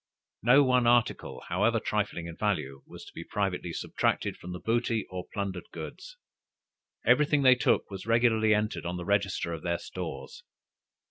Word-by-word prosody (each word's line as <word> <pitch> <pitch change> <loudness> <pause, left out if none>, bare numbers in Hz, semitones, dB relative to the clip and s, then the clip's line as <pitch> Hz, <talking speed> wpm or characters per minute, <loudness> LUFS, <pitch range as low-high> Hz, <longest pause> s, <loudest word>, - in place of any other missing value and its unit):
No 130 +5 +6
one 125 -2 +3
article, 120 -1 +1
however 105 +6 +2
trifling 105 -6 -2
in 85 -1 -7
value, 75 -11 -2
was - - -11
to - - -14
be - - -7
privately 95 -4 -2
subtracted - - -1
from 90 - -9
the 90 - -6
booty 115 0 0
or 90 -1 -6
plundered 100 -3 -4
goods. - - -9 0.9
Every 150 -1 +5
thing 145 -2 +2
they 130 -1 +8
took 125 - +1
was 95 +2 -7
regularly 115 -1 +3
entered 105 0 -1
on 90 +1 -3
the 90 - -6
register 100 -4 0
of 80 - -6
their 85 0 -1
stores. - - -7
105 Hz, 170 wpm, -29 LUFS, 90-120 Hz, 0.9 s, they